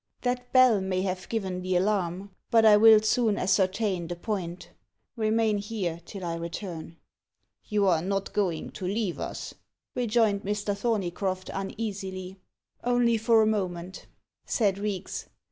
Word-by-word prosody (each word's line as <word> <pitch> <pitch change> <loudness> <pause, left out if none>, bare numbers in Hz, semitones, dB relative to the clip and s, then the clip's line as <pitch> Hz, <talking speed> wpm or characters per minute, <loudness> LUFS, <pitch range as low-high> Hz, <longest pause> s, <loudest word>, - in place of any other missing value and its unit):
"That 245 0 -2
bell 255 -6 +6
may 185 -1 -1
have 185 -1 -3
given 190 -5 -2
the 185 0 -1
alarm. 190 0 0 0.2
But 225 -2 +5
I 215 -1 +8
will 220 0 +8
soon 220 -1 +2
ascertain 190 -1 +1
the 175 - -4
point. 180 -2 -4 0.4
Remain 220 -2 +1
here 195 -5 -3
till 190 +1 -8
I 170 - -2
return." 170 -1 -6 0.7
"You 210 -2 +1
are 170 -4 +3
not 195 +2 -2
going 180 -6 -1
to 185 - -7
leave 200 -1 -1
us?" - - -5 0.4
rejoined 225 -4 +2
Mr. 205 0 -2
Thorneycroft 195 -3 -2
uneasily. 195 -2 -5 0.4
"Only 245 -2 +2
for 225 0 +4
a - - +3
moment," 185 -4 -3 0.4
said 200 -4 +1
Reeks. 200 -2 -4
200 Hz, 140 wpm, -27 LUFS, 185-220 Hz, 0.7 s, I